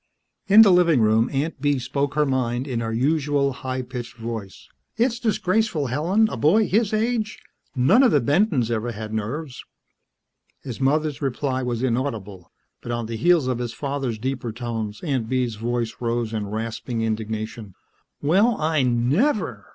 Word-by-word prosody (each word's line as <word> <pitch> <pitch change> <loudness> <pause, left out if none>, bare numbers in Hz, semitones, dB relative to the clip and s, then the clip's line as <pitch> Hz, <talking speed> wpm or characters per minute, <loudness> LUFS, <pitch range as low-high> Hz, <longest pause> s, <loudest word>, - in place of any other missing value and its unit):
In 210 +3 +9
the 200 - +5
living 175 -6 +4
room 110 +1 +3
Aunt 140 +1 -2
Bee 145 -1 +2
spoke 140 +3 -2
her 150 0 +3
mind 130 -1 -1
in 125 -4 -2
her 115 -1 -3
usual, 140 +2 +1
high 130 -1 -4
pitched 120 -1 -7
voice. 115 -4 -7 0.3
"It's 235 0 +1
disgraceful, 210 - 0
Helen. 185 +10 +2
A - - -4
boy 185 - +3
his 215 +2 +1
age.... 220 0 -1 0.4
None 135 - +5
of 265 - +6
the - - +4
Bentons 145 - +1
ever 115 +1 -2
had 110 0 -7
nerves." 125 +6 -4 1.0
His 125 -2 -7
mother's 150 +2 +1
reply 135 -1 -1
was 120 -1 -2
inaudible, 115 -8 -3 0.3
but 120 - -6
on 120 -1 -2
the 115 +1 -5
heels 170 +3 +3
of 125 -2 -1
his 120 -1 -4
father's 135 -3 -3
deeper 125 0 -3
tones, 115 -3 -5
Aunt 130 -8 -1
Bee's 125 -2 0
voice 120 0 -2
rose 115 -1 -2
in 105 -2 -2
rasping 115 +2 -4
indignation. 110 -2 -4 0.5
"Well! 200 +10 +3
I 155 -1 +1
never! 125 - +1
130 Hz, 160 wpm, -23 LUFS, 115-155 Hz, 1.0 s, In